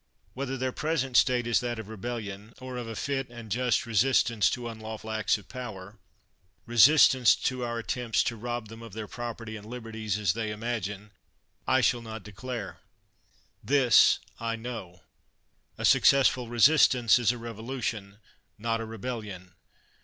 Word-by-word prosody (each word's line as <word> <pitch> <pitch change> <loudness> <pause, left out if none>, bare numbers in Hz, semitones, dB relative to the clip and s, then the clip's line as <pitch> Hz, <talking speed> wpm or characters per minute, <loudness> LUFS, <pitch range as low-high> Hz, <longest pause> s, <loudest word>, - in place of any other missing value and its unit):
Whether 135 0 -4
their 130 0 -1
present 140 -3 -2
state 125 -1 +4
is 120 -1 +2
that 120 -1 -3
of 110 -2 -7
rebellion, 110 -1 -6
or 130 0 -7
of 120 -2 -5
a 115 - -6
fit 135 +1 -2
and 120 -3 -11
just 125 0 +1
resistance 115 -1 +3
to 120 -1 -4
unlawful 110 -1 -7
acts 110 -1 +1
of 100 -3 -15
power 110 -5 -8 0.3
— 90 +2 -42
resistance 130 -1 +7
to 130 -1 -2
our 120 -1 -3
attempts 115 0 -1
to 120 - -2
rob 120 0 -4
them 115 +1 -11
of 115 -4 -11
their 110 0 -6
property 115 -1 -6
and 105 0 -10
liberties, 110 -3 -4
as 100 -5 +1
they 110 0 -3
imagine 105 -2 -4 0.3
— - - -44
I - - +3
shall 120 +1 +2
not 110 -2 -8
declare. 105 +1 -7 0.8
This 135 -4 +5 0.2
I 115 0 -2
know: 110 -7 -8 0.7
a - - -2
successful 130 -3 +4
resistance 120 -1 +5
is 120 -2 +3
a 120 - -5
revolution, 115 -3 -5 0.4
not 115 +1 -1
a - - -4
re 110 0 -8
bellion! 105 -6 -6
115 Hz, 160 wpm, -28 LUFS, 110-125 Hz, 0.8 s, resistance